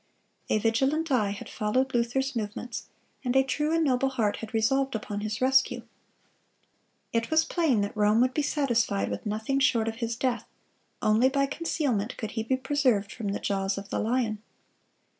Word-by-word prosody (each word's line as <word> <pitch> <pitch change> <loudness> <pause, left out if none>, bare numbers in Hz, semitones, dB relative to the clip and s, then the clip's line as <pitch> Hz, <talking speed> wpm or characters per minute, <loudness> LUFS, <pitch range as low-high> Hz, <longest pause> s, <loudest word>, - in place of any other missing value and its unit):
A - - +3
vigilant 270 +9 +1
eye 220 -6 +3
had 200 0 -6
followed 255 +5 0
Luther's 245 +3 0
movements, 225 +2 -4 0.4
and 250 -1 -1
a 265 - +6
true 300 +4 -1
and 330 0 +2
noble 270 -2 +2
heart 230 -6 0
had 225 - -7
resolved 265 +4 +1
upon 210 -1 -4
his 215 +2 -4
rescue. 265 +1 +3 1.3
It 230 0 0
was 315 0 +3
plain 305 - +1
that 200 +1 -3
Rome 210 +1 +3
would 255 0 +2
be 300 - +1
satisfied 235 - 0
with 100 - -4
nothing 220 +6 -1
short 235 -4 +2
of 225 0 -3
his 230 -1 -2
death; 245 -1 -1 0.6
only 220 +5 +4
by 275 0 +2
concealment 275 -7 -1
could 220 - -4
he 225 - -2
be 260 +4 0
preserved 260 -7 +1
from 215 - -5
the 200 - -2
jaws 195 0 -1
of 200 0 -7
the - - 0
lion. 225 -2 0
235 Hz, 180 wpm, -27 LUFS, 215-270 Hz, 1.3 s, a